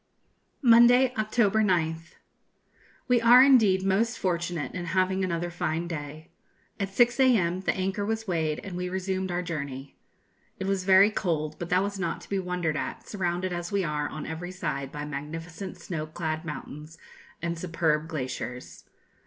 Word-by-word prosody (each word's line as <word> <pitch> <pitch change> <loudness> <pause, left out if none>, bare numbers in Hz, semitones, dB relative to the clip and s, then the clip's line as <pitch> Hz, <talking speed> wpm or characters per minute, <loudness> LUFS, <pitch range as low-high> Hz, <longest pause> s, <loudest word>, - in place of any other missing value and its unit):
Monday, 245 +1 +6
October 215 -1 +2
9th. 165 -4 0 0.9
We 245 -2 +3
are 240 +2 +8
indeed 220 -9 +5
most 220 +5 +1
fortunate 175 -4 -2
in 180 -1 -4
having 190 +2 +1
another 175 -1 -2
fine 165 0 -2
day. 155 -1 -7 0.5
At 200 -1 -1
6 240 +5 +3
a.m. 195 -10 +3
the - - 0
anchor 190 +2 -1
was 220 +1 -2
weighed, 160 -4 0
and 195 -3 -7
we 180 0 -3
resumed 190 0 -2
our 175 +1 -1
journey. 140 -5 -6 0.6
It 190 - -4
was 195 -1 -1
very 195 +2 +6
cold; 155 -7 -2
but 175 - -5
that 185 +2 +3
was 200 -1 -4
not 180 -3 -2
to - - -14
be 195 - 0
wondered 180 -4 -2
at, - - -5
surrounded 180 -2 -2
as 175 0 -4
we 200 -1 +1
are 150 -2 -2
on 155 - -6
every 165 +2 -5
side 150 -7 -4
by 150 0 -5
magnificent 165 +6 -6
snow 155 -3 -5
clad 155 0 -4
mountains 150 0 -8 0.4
and 170 0 -3
superb 160 -3 0
glaciers. 125 -5 -6
175 Hz, 160 wpm, -27 LUFS, 160-195 Hz, 0.9 s, are